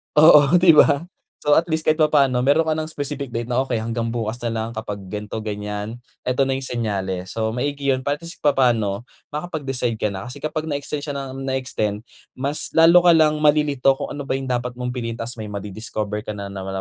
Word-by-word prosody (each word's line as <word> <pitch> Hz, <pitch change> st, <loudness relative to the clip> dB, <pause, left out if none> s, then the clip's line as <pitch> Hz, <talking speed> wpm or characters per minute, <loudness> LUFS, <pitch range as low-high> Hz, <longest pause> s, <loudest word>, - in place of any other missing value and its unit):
oo, 150 Hz, 0 st, +7 dB
di 175 Hz, -1 st, +7 dB
ba? 150 Hz, 0 st, +5 dB, 0.4 s
So 145 Hz, -, +5 dB
at 165 Hz, +2 st, +3 dB
least 160 Hz, 0 st, -1 dB
kahit 155 Hz, +1 st, +2 dB
papaano 140 Hz, -5 st, +3 dB
mayro'n 145 Hz, +5 st, +3 dB
ka 160 Hz, -, +1 dB
ng 155 Hz, 0 st, -3 dB
specific 145 Hz, -2 st, -4 dB
date 115 Hz, 0 st, -3 dB
na 125 Hz, +1 st, 0 dB
okey 130 Hz, -3 st, -1 dB
hanggang 115 Hz, +1 st, -2 dB
bukas 115 Hz, 0 st, -3 dB
nalang 115 Hz, -1 st, -3 dB
kapag 110 Hz, -2 st, -5 dB
ganito, 105 Hz, +3 st, -6 dB
ganyan, 105 Hz, +2 st, -5 dB, 0.2 s
ito 125 Hz, +2 st, +1 dB
na 135 Hz, 0 st, +1 dB
yung 135 Hz, -, -4 dB
senyales. 95 Hz, -7 st, -3 dB
So 110 Hz, 0 st, 0 dB
maigi 140 Hz, +2 st, 0 dB
yun 130 Hz, -, -2 dB
para 145 Hz, +2 st, -1 dB
at 170 Hz, -, -12 dB
least 170 Hz, -, -8 dB
papaano 120 Hz, -7 st, +2 dB, 0.2 s
makapag-decide 145 Hz, -6 st, -2 dB
ka 110 Hz, -1 st, -1 dB
na. 95 Hz, 0 st, -6 dB
Kasi 135 Hz, +3 st, -8 dB
kapag 155 Hz, 0 st, -3 dB
na 155 Hz, -, -3 dB
extend 145 Hz, +1 st, -3 dB
siya 145 Hz, -, -4 dB
ng 135 Hz, -1 st, -5 dB
na 130 Hz, -, -1 dB
extend, 110 Hz, -6 st, -2 dB, 0.3 s
mas 140 Hz, +3 st, -2 dB
lalo 170 Hz, +2 st, +6 dB
ka 175 Hz, -, +8 dB
lang 155 Hz, -1 st, +4 dB
malilito 150 Hz, -3 st, +3 dB
kung 135 Hz, -, -6 dB
ano 145 Hz, -1 st, -6 dB
ba 135 Hz, -, -1 dB
yung 135 Hz, -1 st, -3 dB
dapat 125 Hz, 0 st, -1 dB
mong 125 Hz, 0 st, -4 dB
piliin 120 Hz, -2 st, -4 dB
ta's 115 Hz, +1 st, -5 dB
may 110 Hz, -, -5 dB
madi-discover 105 Hz, +1 st, -5 dB
ka 105 Hz, -, -4 dB
nanaman 100 Hz, -1 st, -6 dB
130 Hz, 215 wpm, -22 LUFS, 110-145 Hz, 0.4 s, ka